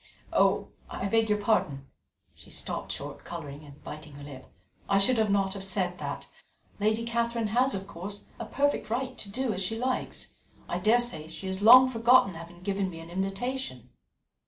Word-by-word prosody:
Oh! - - +3 0.2
I - - -4
beg 225 +2 +2
your 210 0 +2
pardon 155 - +1 0.3
" - - -44
she - - -16
stopped - - -4
short, - - -6
colouring 145 -3 -7
and 145 0 -14
biting 155 0 -8
her 145 0 -10
lip 135 -2 -10 0.4
"I 195 - +4
should 220 +1 +3
not 195 -1 +2
have 195 -1 -5
said 185 -2 -1
that. - - -4 0.5
Lady 220 +2 +1
Catherine 235 -1 0
has, 250 +2 +3
of 195 0 -4
course, 200 +3 -7
a 230 - -5
perfect 285 +1 0
right 255 +3 -2
to 200 - -4
do 245 +2 0
as 185 - -2
she 225 +4 -1
likes. 255 +2 -2 0.3
I 175 - -2
daresay 215 -6 +2
she 160 +4 -8
has 190 +1 -3
long 250 +4 +10
forgotten 235 -4 +5
having 170 +2 -11
given 195 -1 0
me 165 -2 -8
an 165 +1 -10
invitation." 195 - -3
200 Hz, 180 wpm, -29 LUFS, 175-230 Hz, 0.5 s, long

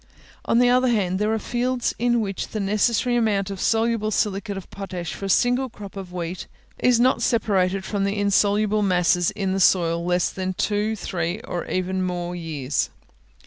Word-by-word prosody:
On - - +2
the 245 0 +5
other 255 +1 +3
hand, 195 -6 +1
there 210 +1 +1
are 220 - +1
fields 245 +2 -1
in 240 0 +2
which 195 -3 -3
the 215 - -5
necessary 215 +4 +1
amount 205 -4 +1
of 195 - -6
soluble 225 -1 +1
silicate 200 -1 -1
of 195 - -8
potash 180 -6 -5
for 195 - -6
a - - -3
single 245 +5 +2
crop 205 -3 -11
of 190 -2 -7
wheat 175 0 -5 0.3
is 250 -2 +3
not 255 +2 +3
separated 195 -4 +1
from 200 -1 -1
the 200 +1 -1
insoluble 205 +1 +2
masses 180 -2 +2
in 195 -2 -2
the 195 - -1
soil 170 -3 +3
in 170 - -5
less 180 0 +1
than 185 -1 -3
two, 210 +3 0
three, 175 -1 -3
or 175 -5 -5
even 185 0 -1
more 180 -1 -3
years. 150 -5 -2
200 Hz, 185 wpm, -23 LUFS, 180-220 Hz, 0.3 s, the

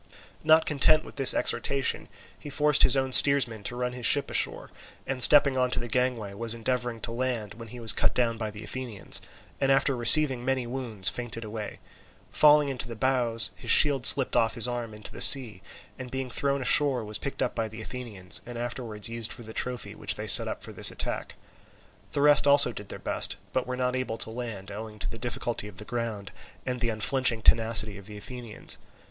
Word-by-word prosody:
Not 160 +1 +4
content 155 +2 +2
with - - -14
this 135 -2 +3
exhortation, 135 -2 0 0.3
he 145 - -9
forced 150 +1 +2
his 135 +1 +5
own 130 0 -1
steersman 130 -6 +3
to 120 - -4
run 125 0 -3
his 125 -2 -1
ship 145 - +3
ashore, - - -1 0.3
and 130 -1 -4
stepping 140 0 +6
on 125 0 +1
to - - -2
the 120 - -6
gangway, 120 -4 -2
was 115 +2 -5
endeavouring 120 0 -3
to - - -2
land, 115 -4 -4
when 115 +1 -11
he 120 +3 -11
was 115 -2 +1
cut - - -1
down 120 -2 0
by 110 -2 -3
the 105 0 -11
Athenians, 120 -1 -3 0.4
and 135 -1 +1
after 135 0 +2
receiving 130 +1 +4
many 130 -1 -1
wounds 120 -7 -1
fainted 120 -1 -6
away. 110 -1 -7 0.5
Falling 150 -1 +4
into 125 -3 -4
the 115 - -8
bows, 120 -1 +2
his - - -9
shield 140 -4 +4
slipped 135 -2 +5
off 115 -1 +1
his 115 +1 0
arm 120 -3 -5
into 105 -1 -9
the - - -10
sea, 120 -9 +6 0.4
and 125 0 -8
being 130 0 -5
thrown 140 +2 -2
ashore 135 -2 +4
was 105 0 -1
picked 140 - -4
up 125 - -3
by 115 -1 -3
the 110 +1 -11
Athenians, 105 -4 -6
and 120 0 -9
afterwards 120 -3 -3
used 115 -1 -3
for 120 - -10
the 110 0 -11
trophy 125 +1 -3
which - - -1
they - - -6
set - - +5
up - - -6
for - - -8
this - - +2
attack. - - -5 0.8
The 140 - -1
rest 145 0 +4
also 140 0 +5
did 105 - -10
their - - -7
best, - - -3 0.2
but 130 -1 -2
were 125 0 -4
not 125 0 -1
able 130 -3 -4
to 110 - -3
land, 110 -5 -7
owing 105 +1 -9
to 95 -2 -4
the 115 - -9
difficulty 120 -3 -4
of 100 -3 -13
the 105 - -8
ground 115 -5 -5 0.3
and 125 -1 -4
the 120 - 0
unflinching 115 +1 0
tenacity 110 -2 +3
of 100 - -15
the 105 -1 -10
Athenians. 120 +1 -4
120 Hz, 210 wpm, -26 LUFS, 110-130 Hz, 0.8 s, stepping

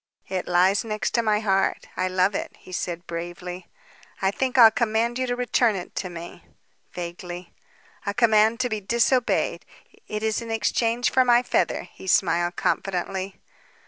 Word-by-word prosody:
"It 185 -1 -3
lies 180 +3 +3
next 220 +1 -1
my 215 -2 +1
heart. 195 -2 +1
I 185 - 0
love 185 +2 +2
it," - - -4
he - - -15
said 175 -1 -4
bravely. 175 +2 -6 0.5
"I 190 0 +1
think 260 +4 -1
I'll 230 -3 +9
command 235 +1 0
you 255 - 0
to 245 - -1
return 245 -2 +2
it 180 -2 -6
to 185 - -2
me," 170 0 -9 0.5
vaguely. 175 0 -7 0.5
"A 200 - 0
command 220 0 +4
to 250 - +1
be 215 -2 -3
disobeyed. 235 +4 +1 0.4
It 215 0 -4
is 220 0 0
in 230 - -7
exchange 230 +2 +1
for 260 - +4
my 245 0 +4
feather," - - 0
he 190 - -12
smiled 175 -1 +2
confidently. 190 0 -2
205 Hz, 160 wpm, -24 LUFS, 180-230 Hz, 0.5 s, I'll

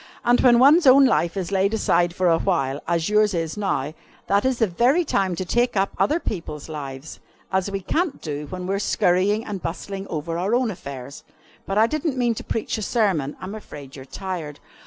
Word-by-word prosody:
And 240 +1 +4
when 245 -2 +6
one's 290 +5 +6
own 270 +1 +8
life 175 -7 +1
is 185 -1 -3
laid 200 +2 +1
aside 175 -4 +1
for 185 -1 +1
a 165 -1 +3
while, 145 -8 -1
as 170 -1 0
yours 210 -2 +3
is 165 -2 -2
now, 155 -8 -2 0.3
that 200 +3 +1
is 260 -2 +1
the 225 - +3
very 245 - +2
time 190 - 0
to 185 - -4
take 240 +4 +1
up 195 +1 +1
other 310 +3 +2
people's 165 - -5
lives, 140 -2 -7 0.3
as 190 +1 0
we 195 0 -4
can't 320 - -1
do 150 -1 -5
when 180 +2 -6
we 190 - -1
are 200 - 0
scurrying 200 +3 +1
and 200 -3 -5
bustling 195 +4 -5
over 165 +1 -4
our 200 +6 +1
own 245 -2 +1
affairs. 140 -6 -9 0.4
But 195 - -1
I 220 - +6
didn't 305 +1 -2
mean 240 -2 +2
to - - -7
preach 225 0 -3
a - - -5
sermon. 190 - 0
I'm 185 +2 -6
afraid 145 -10 -10
you're 135 - -9
tired." 165 -3 -6
195 Hz, 210 wpm, -23 LUFS, 165-225 Hz, 0.4 s, own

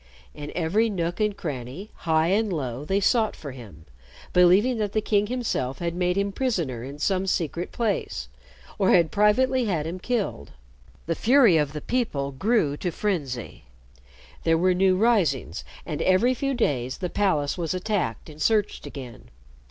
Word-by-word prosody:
In 145 0 -7
every 185 +7 +1
nook 175 -3 -2
and 210 -2 0
cranny, 140 - -6
high 160 0 +1
and 210 +2 +1
low, 135 -5 -3
they 190 +6 0
sought 220 +2 +2
for 145 - -8
him, 105 - -12 0.5
believing 195 +7 +4
that 205 -2 -2
the 215 - +2
king 205 -1 +1
himself 225 - -2
had 170 -1 -2
made 180 +1 0
him 200 0 0
prisoner 170 - -2
in 140 +3 -8
some 190 +4 0
secret 170 -1 -1
place, 200 - -2 0.5
or 195 - +3
had 170 -3 +4
privately 250 +5 +3
had 170 -8 -1
him 170 +3 -5
killed. 205 - -3 0.5
The - - 0
fury 240 -6 +5
of 150 -2 0
the 150 - -5
people 150 - -1
grew 155 - +1
to 180 - -2
frenzy. 145 - -3 0.8
There 165 0 +3
were 185 +2 +3
new 185 0 +3
risings, 170 - +1 0.2
and 150 -3 -4
every 195 +7 +3
few 275 +2 -2
days 130 - -1
the 180 - -3
palace 155 -8 +1
was 170 -1 -2
attacked 185 - -2
and 155 -1 -11
searched 210 +2 +1
again. 125 - -10
180 Hz, 165 wpm, -25 LUFS, 145-210 Hz, 0.8 s, fury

